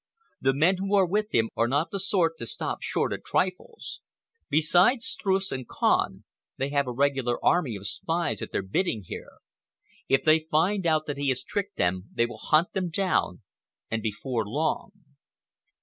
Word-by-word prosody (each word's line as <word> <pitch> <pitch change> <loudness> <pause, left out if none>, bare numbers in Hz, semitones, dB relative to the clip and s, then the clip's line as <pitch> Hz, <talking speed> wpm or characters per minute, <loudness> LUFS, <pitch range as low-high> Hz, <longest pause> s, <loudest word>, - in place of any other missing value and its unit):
The 135 0 +2
men 170 +6 +3
who 195 +2 0
are 195 -2 +5
with 210 +4 0
him 115 -1 +2
are 115 - +2
not 145 +6 0
the 195 - -2
sort 175 -4 +1
to 115 - -4
stop - - -3
short - - -1
at - - -6
trifles. 190 - -2 0.5
Besides 175 - +4
Streuss 195 -1 0
and 130 -2 -4
Kahn, - - +1 0.3
they 135 +1 -1
have 140 -1 +1
a - - -2
regular 135 -2 +1
army 150 -11 +3
of 100 0 -8
spies 165 - -2
at - - -5
their - - -1
bidding 110 - -1
here. - - -8 0.8
If 135 - +3
they 155 0 +4
find 180 +4 +2
out 155 -1 +2
that 145 -1 -4
he 140 -1 +1
has 130 0 0
tricked 200 +5 -4
them, 90 +1 0
they 115 - +3
will 120 - -8
hunt 155 +3 +2
him 185 -2 -1
down, 180 - 0 0.5
and 110 0 -1
before 110 +2 -2
long." 145 - -1
155 Hz, 180 wpm, -27 LUFS, 120-185 Hz, 0.8 s, are